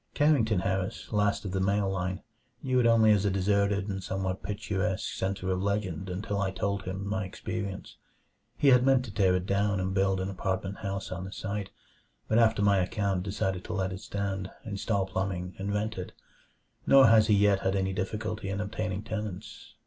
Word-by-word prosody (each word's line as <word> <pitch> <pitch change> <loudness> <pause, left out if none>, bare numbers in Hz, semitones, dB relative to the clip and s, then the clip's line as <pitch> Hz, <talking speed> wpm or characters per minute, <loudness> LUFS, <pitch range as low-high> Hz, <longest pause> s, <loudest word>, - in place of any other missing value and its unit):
Carrington 115 -10 +3
Harris, 95 +3 -2
last 105 -1 +1
of 95 - -3
the 95 - -1
male 100 +1 +1
line, 95 0 -2 0.4
knew 130 -2 +2
it 120 - +4
only 115 -2 +6
as 105 -2 +3
a 100 - +2
deserted 100 +1 +1
and 95 -1 -3
somewhat 95 0 -3
picturesque 95 0 -2
center 95 0 -2
of 90 0 0
legend 100 -3 -2
until 100 +3 -3
I 95 - +1
told 100 +1 -2
him 95 +2 -4
my 105 0 -1
experience. 100 0 -5 0.6
He 145 - +4
had 125 -1 +6
meant 130 -1 +4
to 105 - -9
tear 95 -3 +3
it 90 0 -1
down 100 0 +1
and 95 +1 -1
build 95 -1 +2
an 95 - -2
apartment 95 +1 -3
house 100 -2 -4
on 90 0 -4
the 95 - -7
site, 100 0 -4 0.6
but 110 - +3
after 110 -3 +3
my 100 -1 +4
account 95 0 0
decided 95 -1 -2
to 110 - -4
let 95 -2 -1
it 95 - -7
stand, 95 -2 -3 0.2
install 100 -1 -1
plumbing, 95 -1 -3
and 100 +1 -2
rent 105 0 -2
it. 90 - -6 0.7
Nor 135 -1 +8
has 110 -1 +6
he 105 - +5
yet 100 -1 +4
had 95 0 0
any 95 0 0
difficulty 105 +2 -3
in 100 +1 -2
obtaining 105 -1 -3
tenants. 105 -4 -6
100 Hz, 195 wpm, -29 LUFS, 95-105 Hz, 0.7 s, Nor